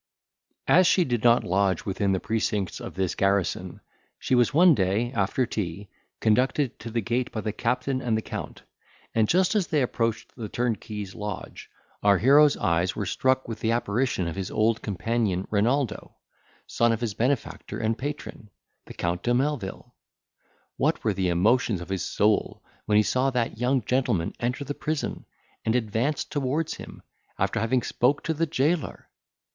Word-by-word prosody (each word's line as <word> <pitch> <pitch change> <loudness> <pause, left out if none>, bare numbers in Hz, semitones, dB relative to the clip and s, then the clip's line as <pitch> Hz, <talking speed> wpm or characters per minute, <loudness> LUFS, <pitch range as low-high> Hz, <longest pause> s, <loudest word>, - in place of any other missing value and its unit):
As 180 +1 +5
she 180 - +4
did 120 -5 -1
not 120 0 +5
lodge 95 -1 +1
within 100 0 0
the 95 - +1
precincts 105 -3 -1
of - - -8
this 95 -1 -1
garrison, 100 -1 0 0.4
she - - -2
was 120 -1 +4
one 170 +3 +6
day, 105 +2 0
after 105 +5 +1
tea, 100 -3 -4 0.3
conducted 125 +4 +1
to 115 - -7
the 115 +1 -1
gate 120 +4 -1
by 110 - -3
the 105 0 -3
captain 125 +3 -1
and 115 -3 0
the 110 - -3
Count, - - -7 0.5
and 110 -1 +3
just 185 +2 +3
as 205 -5 +1
they 150 -4 +1
approached 115 -2 -2
the 110 -4 -6
turnkey's 105 -4 -3
lodge, 105 -2 -7 0.3
our 100 -1 +5
hero's 140 +7 +5
eyes 85 +2 +1
were 105 - -2
struck 130 +6 +1
with 115 -2 -5
the 110 - 0
apparition 115 -4 0
of 85 - -4
his 95 -2 -4
old 110 +1 +1
companion 105 -2 -1
Renaldo, 115 +2 0 0.5
son 120 0 +2
of 115 - -1
his 115 -4 -1
benefactor 125 +4 -2
and 110 +1 0
patron, 140 -5 -6 0.4
the - - -10
Count 85 +1 -2
de 120 +2 +1
Melvil. 130 -7 -2 0.8
What - - 0
were 110 - +1
the 95 -1 0
emotions 105 +4 +2
of 85 - -9
his 95 -3 -2
soul, 105 0 0 0.2
when 105 - +2
he 105 - +6
saw 130 +5 +1
that 120 -4 -2
young 125 0 +1
gentleman 120 -10 0
enter 125 +4 -2
the 140 - -4
prison, 155 +1 -3 0.4
and 110 - +1
advance 120 +5 0
towards 145 +2 -2
him, - - -11 0.3
after 115 - 0
having 115 +3 +1
spoke 135 +4 +1
to 160 - 0
the 165 +2 0
jailor! 155 +2 -1
115 Hz, 170 wpm, -26 LUFS, 100-130 Hz, 0.8 s, one